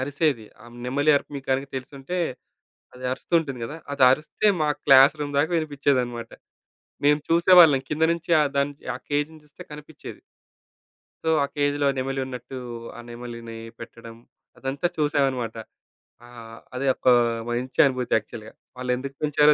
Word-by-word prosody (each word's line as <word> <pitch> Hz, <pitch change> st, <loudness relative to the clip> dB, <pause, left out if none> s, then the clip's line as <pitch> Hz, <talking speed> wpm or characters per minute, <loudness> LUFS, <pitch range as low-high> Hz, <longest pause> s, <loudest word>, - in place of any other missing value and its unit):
అరిసేది. 140 Hz, -3 st, 0 dB, 0.2 s
ఆ -, -, -15 dB, 0.2 s
నెమలి 145 Hz, +4 st, +2 dB
అరుపు 140 Hz, -, -4 dB
మీకు 135 Hz, -, -9 dB
గనక 135 Hz, +1 st, -1 dB
తెలిసుంటే 135 Hz, +6 st, -6 dB, 0.8 s
అది 125 Hz, 0 st, -8 dB
అరుస్తూ 130 Hz, -, -7 dB
ఉంటుంది 135 Hz, -6 st, -6 dB
గదా! 155 Hz, +5 st, -7 dB
అది 140 Hz, -2 st, +1 dB
అరిస్తే 155 Hz, +9 st, 0 dB
మా 150 Hz, -, +2 dB, 0.2 s
క్లాస్ 135 Hz, +1 st, +7 dB
రూమ్ 145 Hz, -1 st, -3 dB
దాకా 155 Hz, +4 st, +2 dB
వినిపిచ్చేదనమాట. 130 Hz, -6 st, -1 dB, 0.7 s
మేము 150 Hz, +1 st, +4 dB
చూసేవాళ్ళం. 170 Hz, -4 st, +7 dB
కింద 155 Hz, +1 st, 0 dB
నుంచి 170 Hz, 0 st, -9 dB
ఆ -, -, +4 dB
దాన్ 140 Hz, +1 st, +1 dB, 0.2 s
ఆ -, -, -5 dB
కేజ్‌ని 150 Hz, +2 st, -2 dB
చూస్తే 150 Hz, -, -16 dB
కనిపిచ్చేది. 150 Hz, 0 st, -10 dB, 1.0 s
సో, 160 Hz, -, +2 dB
ఆ -, -, 0 dB
కేజ్‌లో 145 Hz, 0 st, +1 dB
నెమలున్నట్టు 130 Hz, -1 st, -4 dB, 0.4 s
ఆ -, -, -7 dB
నెమలిని 120 Hz, -1 st, -8 dB, 0.2 s
పెట్టడం 115 Hz, 0 st, -11 dB, 0.4 s
అదంతా 135 Hz, +5 st, -2 dB
చూసామనమాట. 135 Hz, -6 st, 0 dB, 0.7 s
ఆహ్, 115 Hz, -2 st, -12 dB, 0.2 s
అది 130 Hz, +2 st, -2 dB
ఒక -, -, -6 dB, 0.4 s
మంచి 125 Hz, +2 st, -4 dB
అనుభూతి 130 Hz, -2 st, -1 dB
యాక్చువల్‌గా. 110 Hz, 0 st, -8 dB, 0.2 s
వాళ్ళెందుకు 125 Hz, +2 st, -3 dB
పెంచారో 150 Hz, 0 st, +4 dB
135 Hz, 140 wpm, -24 LUFS, 125-150 Hz, 1.0 s, క్లాస్